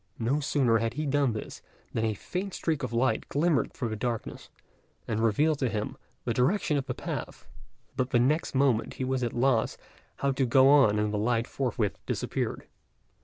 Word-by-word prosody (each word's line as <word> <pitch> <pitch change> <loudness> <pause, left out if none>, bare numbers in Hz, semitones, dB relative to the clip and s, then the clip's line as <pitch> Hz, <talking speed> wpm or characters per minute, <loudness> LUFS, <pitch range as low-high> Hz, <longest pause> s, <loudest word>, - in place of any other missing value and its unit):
No 120 +6 0
sooner 130 -6 +2
had 115 +1 -2
he 155 +2 -2
done 140 -3 +2
this 110 - -7 0.3
than 115 - 0
a 110 -1 0
faint 185 - -4
streak 160 -3 -1
of 125 - -3
light 120 +3 0
glimmered 150 -1 +1
through 120 - -3
the 110 - -3
darkness, 115 +1 -4 0.6
and 110 - -1
revealed 145 +7 +2
to 130 - +1
him 105 -1 -3 0.3
the - - 0
direction 150 +5 +1
of 140 -2 -1
the - - -3
path; - - -6 0.5
but 130 0 0
the 125 - +3
next 140 +5 +1
moment 130 -4 +2
he - - -3
was 130 0 -1
at 120 - -1
a - - -6
loss 120 -2 +2 0.4
how 140 - 0
to 135 0 +1
go 130 +2 +6
on 135 -8 +6
and 105 0 0
the 105 - 0
light 115 +1 +1
forthwith 120 -7 -2
disappeared. - - -2
130 Hz, 195 wpm, -28 LUFS, 115-140 Hz, 0.6 s, go